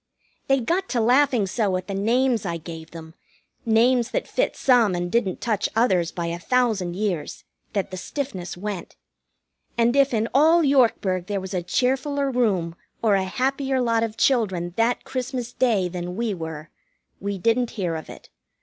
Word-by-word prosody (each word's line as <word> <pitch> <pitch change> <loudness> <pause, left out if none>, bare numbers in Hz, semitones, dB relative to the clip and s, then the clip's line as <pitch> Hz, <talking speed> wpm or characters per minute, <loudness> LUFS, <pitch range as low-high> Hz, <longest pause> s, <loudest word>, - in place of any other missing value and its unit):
They 270 0 +3
got 350 +10 -1
to 245 - 0
laughing 245 -1 +3
so 195 -1 0
at 185 - -6
the 200 - -5
names 235 +4 +1
I 170 -4 -2
gave 165 0 -9
them 160 -1 -10 0.5
names 235 +2 +3
that - - -2
fit - - 0
some, 235 -8 +3
and 175 0 -3
didn't 210 -6 0
touch 215 -4 0
others 185 -7 +2
by 170 - -4
a 170 +1 -3
thousand 215 -5 0
years 185 -7 -3 0.3
that 195 -1 -2
the 185 - -5
stiffness 190 -6 -5
went. 200 -1 -5 0.8
And 235 +2 +3
if 275 0 +4
in 225 -1 0
all 320 +5 +5
Yorkburg 225 - +2
there 205 -1 -1
was 190 +1 -7
a 180 - 0
cheerfuller 270 - 0
room 195 -10 +1 0.3
or 215 -3 +4
a 195 -1 +2
happier 265 +6 -1
lot 230 -2 +2
of 225 -1 -3
children 190 -11 +1
that 230 +3 +1
Christmas 250 -2 -4
Day 220 -8 +2
than 180 0 -5
we 230 0 -1
were, 160 -3 -7 0.5
we 200 0 -3
didn't 230 +5 +1
hear 175 -5 -1
of 160 - -7
it. - - -12
220 Hz, 175 wpm, -24 LUFS, 180-250 Hz, 0.8 s, all